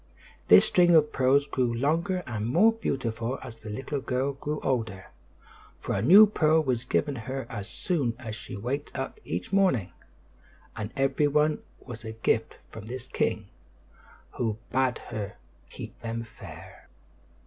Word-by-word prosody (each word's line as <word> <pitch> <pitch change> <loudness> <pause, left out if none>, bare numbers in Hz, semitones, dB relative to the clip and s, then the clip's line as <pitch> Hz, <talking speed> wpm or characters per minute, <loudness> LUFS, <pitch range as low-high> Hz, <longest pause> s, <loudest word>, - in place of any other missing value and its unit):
This - - +8
string 175 -1 +5
of 150 -1 +4
pearls 135 +2 +3
grew 125 -4 0
longer 165 +9 0
and 110 -2 -3
more 190 - +5
beautiful 125 - -2
as 120 -3 -9
the 110 -1 -10
little 135 +6 -4
girl 130 +2 -1
grew 150 +2 -4
older, 115 -7 -2 0.7
for - - -3
a 95 - 0
new 190 - +9
pearl 160 -6 +3
was 125 -3 -1
given 145 +2 0
her 130 +3 -5
as 105 -3 -6
soon 125 -1 -1
as 115 -4 -6
she - - -8
waked 130 +10 -4
up 135 - -4
each 90 - -4
morning; 180 - +2 0.8
and 105 0 -5
every 135 +2 +2
one 150 +1 +2 0.2
was 120 -3 -9
a 110 -1 -6
gift 110 0 0
from 110 -1 -9
this 130 +1 -6
king, 110 -5 -1 0.9
who 110 -3 -1
bade 130 -1 +1
her 105 -3 -6 0.3
keep - - -10
them 115 0 -3
fair. 110 - -12
130 Hz, 155 wpm, -27 LUFS, 115-145 Hz, 0.9 s, new